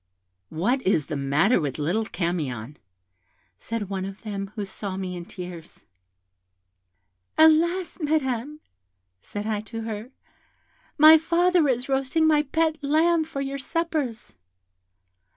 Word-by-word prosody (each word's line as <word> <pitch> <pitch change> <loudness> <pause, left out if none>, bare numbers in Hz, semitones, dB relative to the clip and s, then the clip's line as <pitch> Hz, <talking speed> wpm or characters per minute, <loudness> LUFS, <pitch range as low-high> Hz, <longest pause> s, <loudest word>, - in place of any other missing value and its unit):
'What 235 +12 0
is 185 - +1
the 155 - -4
matter 145 - +2
with 140 -4 -3
little 175 +9 0
Camion?' 150 - -3 0.8
said 225 -3 -4
one 190 -1 -3
of 195 +3 -8
them, 200 -2 -4
who 210 -2 -3
saw 195 0 -6
me 185 -1 -4
in 175 -1 -7
tears. 175 -3 -10 1.5
'Alas, 335 +4 +4
Madam!' 295 -2 -1 0.6
said 205 - -6
I 215 -1 -1
to 225 +1 -7
her, 220 +1 -5 0.9
'my 310 +1 +9
father 345 0 +3
is 250 -1 0
roasting 270 +4 +1
my 305 -1 +4
pet 315 +1 -1
lamb 320 +3 +3
for 275 -3 -5
your 275 0 -4
suppers.' 300 -5 -3
230 Hz, 125 wpm, -25 LUFS, 190-310 Hz, 1.5 s, my